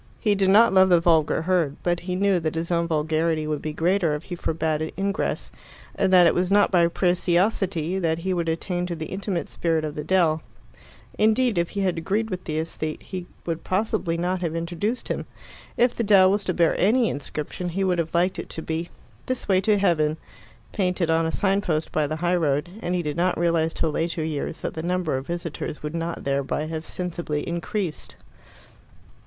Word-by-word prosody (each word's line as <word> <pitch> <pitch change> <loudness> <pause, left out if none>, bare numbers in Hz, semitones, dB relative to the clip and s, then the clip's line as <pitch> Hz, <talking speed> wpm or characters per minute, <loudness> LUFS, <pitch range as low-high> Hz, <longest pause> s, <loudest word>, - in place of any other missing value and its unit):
He 210 -3 +2
did 195 -1 +2
not 215 +2 +6
love 190 0 +6
the 175 -2 +6
vulgar 160 -2 +2
herd, 170 -5 +1
but 175 -1 +1
he 180 +1 -4
knew 195 -1 +2
that 160 -1 -2
his 165 +2 -2
own 170 -1 +1
vulgarity 160 0 0
would 150 -1 -2
be 155 - -3
greater 170 0 +1
if 150 - -6
he 180 - -6
forbade 160 -2 -1
it 160 - -4
ingress, 195 0 -2 0.4
and 190 - +1
that 180 -2 +7
it 170 - +5
was 180 +1 0
not 205 0 +4
by 175 -3 +4
preciosity 180 0 +1
that 165 -3 0
he 185 +3 -2
would 170 -2 -1
attain 175 +2 -2
to 175 - -3
the 160 -1 -5
intimate 190 -2 -3
spirit 165 -2 -1
of 150 - -4
the 150 - -5
dell. 160 -2 +2 0.8
Indeed, 220 -1 +3
if 170 - 0
he - - +1
had 180 -3 0
agreed 210 +6 -1
with 185 -1 -5
the 155 -1 -3
aesthete, 155 -1 -3
he 180 -2 -6 0.2
would 165 -1 -3
possibly 190 -3 0
not 180 +2 -1
have 165 -2 -2
introduced 175 +8 -2
him. - - -3 0.5
If 245 0 +3
the 235 - -2
dell 195 -3 +6
was 205 +1 0
to 185 - 0
bear 170 -2 +3
any 230 +4 +3
inscription, 150 +4 -4
he 190 +3 -1
would 180 -2 +1
have 165 0 -2
liked 180 +2 +2
it - - -6
to 160 - -6
be 165 +2 -3 0.4
"This 255 -1 -3
way 190 -2 +3
to 210 +1 +3
Heaven," 160 -6 +2 0.5
painted 180 -4 0
on 160 0 +2
a - - -1
sign 195 +2 +1
post 160 -5 -1
by 150 -1 +1
the 155 - -3
high 175 +2 +1
road, 150 +1 0
and 180 -3 -1
he 175 - -1
did 150 0 -3
not 180 +1 +1
realize 165 -1 +1
till 160 -1 -1
later 165 +1 -1
years 155 0 -3
that - - -3
the 160 - -4
number 175 -3 -1
of 130 +1 -4
visitors 170 -3 -5
would 150 +1 -4
not 165 0 -3
thereby 140 +2 -1
have 160 0 -5
sensibly 170 -4 -3
increased. 170 0 -3
170 Hz, 210 wpm, -24 LUFS, 160-185 Hz, 0.8 s, that